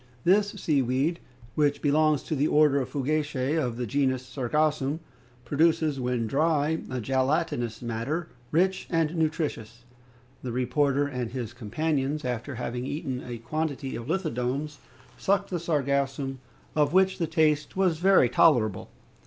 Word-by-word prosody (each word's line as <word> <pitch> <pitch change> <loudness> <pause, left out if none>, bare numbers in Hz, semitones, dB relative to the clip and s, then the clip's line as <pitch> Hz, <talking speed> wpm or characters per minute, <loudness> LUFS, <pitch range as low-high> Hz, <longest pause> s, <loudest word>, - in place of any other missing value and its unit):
This 205 +3 +3
sea 145 -4 +1
weed, 135 +7 0 0.3
which 145 +1 +2
belongs 150 0 +3
to 155 - -2
the 145 +2 +2
order 150 -2 +4
of 130 - -4
Fucacae, 145 0 -1
of 125 -7 -1
the 125 - -2
genus 130 0 0
Sargassum, 145 +3 0 0.5
produces, 155 +1 +2
when 125 -2 -1
dry, 155 +5 +1
a 130 - -3
gelatinous 130 -2 0
matter, 120 +9 -2 0.2
rich 185 +4 +1
and 165 -1 +1
nutritious. 150 -8 -2 0.6
The 125 - -4
reporter 135 +3 +1
and 125 -4 -3
his 120 -2 -5
companions, 140 +5 -2
after 125 +2 -3
having 125 +1 -4
eaten 135 -4 -4
a 120 -1 -6
quantity 140 +2 -3
of 120 - -6
lithodomes, 150 -4 -2 0.4
sucked 200 0 +1
the 175 - -1
sargassum, 140 -4 -1 0.4
of 150 0 +2
which 190 0 +3
the 165 - 0
taste 155 -1 +1
was 180 -4 +2
very 190 -7 +5
tolerable. 115 - +3
145 Hz, 140 wpm, -27 LUFS, 125-155 Hz, 0.6 s, very